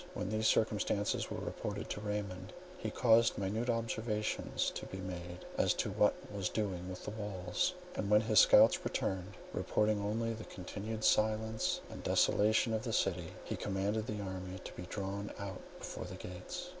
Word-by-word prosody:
When 95 - -2
these 110 +1 +1
circumstances 105 -1 +1
were - - -4
reported - - -4
to 105 - -3
Raymond, 105 -2 -4 0.3
he - - -2
caused 115 -1 +4
minute 105 +5 -1
observations 110 -2 0
to - - -5
be 95 - -7
made 90 -1 -6
as - - +4
to - - -1
what - - +4 0.2
was 100 -2 -1
doing 95 -4 -2
within 95 +3 -6
the 110 - -5
walls, 95 - -1 0.2
and 100 - -2
when 105 0 +6
his 110 -2 +5
scouts - - +7
returned, 95 0 -2 0.2
reporting 105 0 +1
only 115 +3 0
the 110 0 -7
continued 105 +4 -5
silence 110 +1 +2
and - - -7
desolation 110 +2 +3
of 110 - 0
the 115 0 -3
city, 90 -5 0
he - - -3
commanded 105 +2 -1
the 105 -1 -3
army 95 -1 -5
to - - -8
be 90 - -7
drawn 100 +1 -3
out 100 -2 -5 0.2
before - - -6
the 90 +1 -7
gates. 95 - -6
105 Hz, 170 wpm, -34 LUFS, 95-110 Hz, 0.3 s, scouts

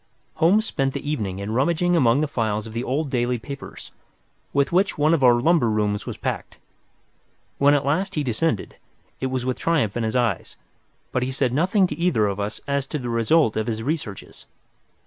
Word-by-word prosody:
Holmes 190 +7 +4
spent 135 -9 -1
the - - -5
evening 105 -11 -2
in 100 +2 -4
rummaging 170 +8 +2
among 135 -3 +4
the 155 - +1
files 110 -5 -1
of 110 - -9
the 115 +2 -2
old 140 +2 -2
daily 125 0 0
papers 140 +4 -9 0.6
with 140 0 +1
which 190 +3 +2
one 150 +2 +3
of 155 -5 +1
our 125 -1 +7
lumber 135 0 +3
rooms 105 -1 -1
was - - -5
packed. - - -4 1.0
When 145 +1 +5
at 140 - 0
last 185 +7 0
he 150 - 0
descended, 120 - -1 0.4
it 130 - -1
was 130 -1 -2
with 130 -1 -2
triumph 145 -12 +1
in 120 - -1
his 110 +1 -2
eyes, 120 -7 -1 0.5
but 125 - 0
he 130 +1 -1
said 130 -2 0
nothing 185 +7 +3
to - - -3
either 170 -11 +2
of 100 0 -2
us 105 +1 -3
as 140 -1 -1
to 150 - -3
the 125 -4 -5
result 115 +2 +2
of 110 0 -1
his 110 -1 -2
researches. 140 - -5
130 Hz, 200 wpm, -23 LUFS, 115-155 Hz, 1.0 s, our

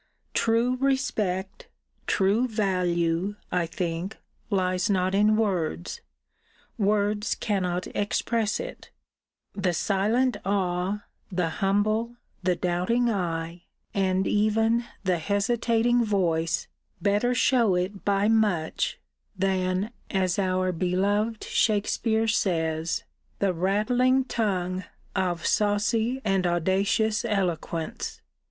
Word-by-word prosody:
True 230 +3 +2
respect, 215 -9 -1 0.4
true 205 +6 +2
value, 180 -3 0 0.2
I 175 -2 +1
think, 170 +4 -3 0.3
lies 185 -1 +1
not 185 -1 +1
in 210 +2 +4
words: 165 - -1 0.7
words 210 +1 +1
cannot 180 -4 -1
express 215 +1 0
it: - - -7 0.6
the 190 -3 0
silent 215 +8 +1
awe, 190 +1 -1 0.3
the 180 -2 0
humble, 215 +4 +1 0.3
the 180 -1 +1
doubting 185 +8 +1
eye, 170 -3 -3 0.3
and 190 -1 +1
even 225 +3 +2 0.2
the 185 -3 +1
hesitating 230 +5 +2
voice, 170 -6 0 0.3
better 210 +5 +2
shew 235 -6 +3
it 185 +3 -2
by 200 0 +2
much, 210 -8 +1 0.4
than, 190 +2 0 0.2
as 185 -2 0
our 185 -1 +1
beloved 200 +5 0
Shakespeare 220 +1 +1
says, 165 -6 0 0.3
The 195 -2 +1
rattling 245 +9 +2
tongue 185 -6 -1 0.3
Of 180 -3 -1
saucy 220 +4 +1
and 195 -3 +2
audacious 195 +5 +1
eloquence. 175 -6 -2
195 Hz, 95 wpm, -26 LUFS, 180-220 Hz, 0.7 s, in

